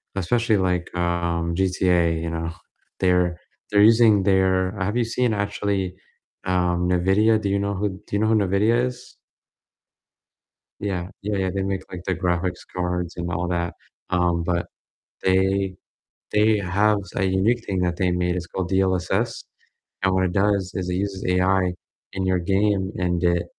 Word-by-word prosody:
especially 110 +3 +1
like, 90 -2 -1
um, 85 -1 -1
GTA, 90 -3 +2
you 85 - -3
know, 80 0 -3 0.5
they're 90 -2 +2 0.3
they're 105 0 +5
using 110 -2 +6
their 95 -1 +2
have 100 +5 -1
you 120 - +3
seen 120 0 0
actually, 100 -2 -2 0.5
um, 90 -1 +1
Nvidia? 100 +5 +3
Do 100 - -1
you 100 0 +1
know 100 0 -1
who 100 +2 -1
do 95 -1 -10
you 100 - +2
know 110 - +2
who 110 - +3
Nvidia 105 +5 +2
is? 125 0 -8 1.6
Yeah, 90 -4 -3
yeah, 105 0 -2
yeah, 95 -1 0
they 100 - -1
make, 95 -1 -2
like, 90 -1 -7
the 95 - 0
graphics 90 0 -2
cards, 90 -1 -2
and 85 0 -3
all 90 +2 -2
that, 85 -1 -1 0.4
um, 85 -1 +1
but 85 0 -1 0.6
they 95 0 +2 0.6
they 105 +1 +4
have 100 +2 +2 0.2
a 95 - 0
unique 100 +6 +1
thing 95 -2 -2
that 90 -1 0
they 90 -1 +1
made, 90 0 0
it's 90 -1 -4
called 95 -2 -3
DLSS, 95 +4 0 0.6
and 95 -1 +2
what 95 0 +2
it 90 - -1
does 100 -1 +1
is 90 -1 -3
it 90 - -1
uses 95 0 -3
AI 90 0 +2 0.4
in 95 -1 -2
your 95 -1 +2
game, 95 +1 +1
and 90 -1 0
it 85 0 +2
95 Hz, 165 wpm, -23 LUFS, 90-100 Hz, 1.6 s, using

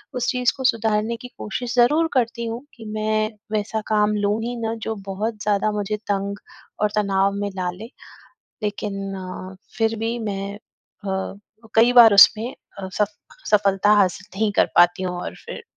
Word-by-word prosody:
उस 245 -1 -1
चीज़ 250 -1 +2
को 265 - -5
सुधारने 225 -1 +1
की 250 - -9
कोशिश 245 +3 -4
ज़रूर 295 +7 +4
करती 235 -2 0
हूँ 230 +4 -5
कि 225 - -11
मैं 215 0 0 0.2
वैसा 215 +1 -1
काम 210 -1 +2
लूँ 205 +2 +1
ही 240 +1 -3
ना 225 0 -2
जो 225 - -2
बहुत 210 +2 -3
ज़्यादा 210 0 +1
मुझे 210 0 -2
तंग 200 0 -2 0.4
और 210 -1 +2
तनाव 200 -1 +2
में 205 - -1
डाले। 185 +4 -4 0.7
लेकिन 205 -1 -3
अ, 185 0 -7 0.2
फिर 225 0 +1
भी 230 +2 -1
मैं 200 -2 -4
अ, 195 -1 -7 0.4
कई 235 +2 +5
बार 235 -3 +9
उसमें 220 +4 +6 0.3
अ, 190 - -5
सफ 210 +1 0 0.4
सफलता 200 -1 +3
हासिल 195 +1 -3
नहीं 215 -1 +2
कर - - +3
पाती 175 +1 +5
हूँ 180 -1 -2
और - - -6
फिर, - - -8
210 Hz, 165 wpm, -22 LUFS, 200-225 Hz, 0.7 s, बार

